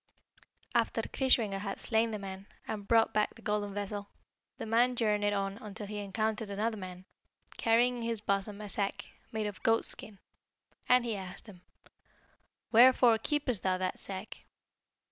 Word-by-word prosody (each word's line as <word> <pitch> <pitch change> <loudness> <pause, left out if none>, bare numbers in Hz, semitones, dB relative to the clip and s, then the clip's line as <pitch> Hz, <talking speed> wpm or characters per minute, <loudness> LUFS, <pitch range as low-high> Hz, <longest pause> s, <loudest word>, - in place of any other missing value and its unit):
"After - - +1
Kreischwinger 230 -7 +2
had 200 -1 -4
slain 225 0 +2
the 215 - -3
man, 195 0 -8 0.2
and 205 -2 -5
brought 225 -1 +4
back 210 0 +1
the 230 - -16
golden 210 -1 -1
vessel, 205 0 -4 0.5
the - - -5
man 240 +3 +3
journeyed 210 -3 +1
on 195 +1 -2
until 210 0 -7
he 210 +1 -5
encountered 215 +2 -2
another 215 +3 -1
man, 185 -2 -8 0.5
carrying 240 +2 +3
in - - -5
his 230 -1 -1
bosom 200 0 -1
a 210 - -6
sack, 200 0 -2 0.3
made 220 -1 -2
of 205 -2 -5
goatskin, 225 -2 +1 0.7
and 250 -1 +5
he 230 -2 -1
asked 190 -1 -8
him, 195 -5 -13 1.1
'Wherefore 240 -1 +7
keepest 265 -8 0
thou 185 -1 +1
that 185 0 -2
sack?' 195 +2 -7
210 Hz, 155 wpm, -31 LUFS, 200-230 Hz, 1.1 s, Wherefore